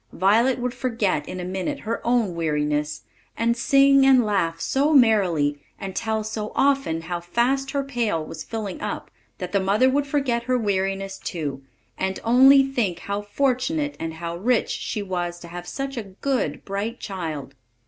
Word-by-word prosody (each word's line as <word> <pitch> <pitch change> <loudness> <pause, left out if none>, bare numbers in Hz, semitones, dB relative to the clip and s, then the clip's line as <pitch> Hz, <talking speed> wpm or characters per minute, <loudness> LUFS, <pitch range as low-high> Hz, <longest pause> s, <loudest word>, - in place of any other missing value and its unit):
Violet 225 +7 +3
would 250 -1 -2
forget 225 - -1
in 185 - -5
a - - -4
minute 190 +11 -3
her 230 +1 -3
own 235 -6 +1
weariness, 150 -2 -1 0.3
and 235 +1 +2
sing 275 +2 +5
and 260 -3 +6
laugh 170 -6 0
so 285 - +1
merrily, 180 - +3 0.2
and 195 -1 -6
tell 220 -1 -1
so 215 0 -4
often 275 -13 +2
how 175 +1 -4
fast 245 +10 0
her 280 0 -1
pail 230 - -1
was - - -7
filling 215 -4 -5
up, 210 -1 -4 0.3
that 180 -1 -5
the 200 - +2
mother 205 +7 +3
would 285 +1 +1
forget 265 -5 0
her 255 0 +2
weariness 195 -2 -1
too, 145 -6 -4 0.4
and 190 0 -1
only 265 +4 +7
think 235 -10 -1
how 200 +1 -3
fortunate 275 +7 0
and 160 0 -4
how 170 +1 -5
rich 235 +6 +1
she 210 - -3
was 175 -2 -3
to 175 - -10
have 175 +1 -8
such 275 +3 -4
a 230 - -2
good, 195 - -2
bright 205 +4 -3
child. 160 -8 -5
210 Hz, 170 wpm, -24 LUFS, 175-255 Hz, 0.4 s, only